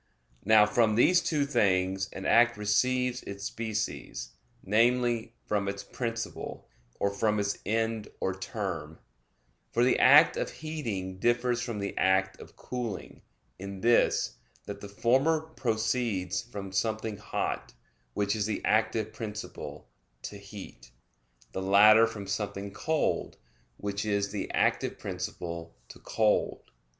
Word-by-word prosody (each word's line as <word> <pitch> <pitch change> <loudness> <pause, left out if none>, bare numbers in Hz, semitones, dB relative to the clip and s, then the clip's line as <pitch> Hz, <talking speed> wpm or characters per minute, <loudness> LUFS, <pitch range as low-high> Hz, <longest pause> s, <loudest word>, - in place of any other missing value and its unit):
Now, 110 0 +6
from 110 0 +2
these 180 +10 +5
two 150 -3 0
things 95 -6 +1
an 95 - -7
act 120 0 +5
receives 125 +5 +1
its 100 0 -8
species, 110 - -4 0.3
namely, 120 +2 +2
from 100 -1 0
its 100 0 -3
principle, 115 -2 -5 0.3
or 100 - +1
from 105 +1 +1
its 100 0 -1
end 110 0 0
or 95 - 0
term; 95 - -5 0.7
for 120 - +2
the 125 - +3
act 150 +4 +7
of - - -1
heating 110 -13 -5
differs 120 +2 +1
from 120 -3 -4
the 100 -1 -4
act 95 0 +2
of - - -13
cooling, 120 -6 -6 0.4
in 100 0 -7
this, 120 0 +3 0.3
that - - -7
the 100 - -8
former 130 +10 +2
proceeds 115 - -1
from 100 -5 -8
something 110 +1 -1
hot, 105 - -3 0.4
which 100 +1 +1
is 105 -1 -1
the 110 - -3
active 110 0 +1
principle, 105 -2 -7 0.4
to - - -6
heat; 100 - -11 0.6
the 95 - -4
latter 105 +4 +7
from 105 -3 -7
something 100 0 -3
cold, 160 +5 -1 0.4
which 100 0 -3
is 100 -1 0
the 100 -2 -4
active - - +1
principle, 85 -1 -5
to - - -12
cold. 110 -2 +1
105 Hz, 130 wpm, -29 LUFS, 100-120 Hz, 0.7 s, act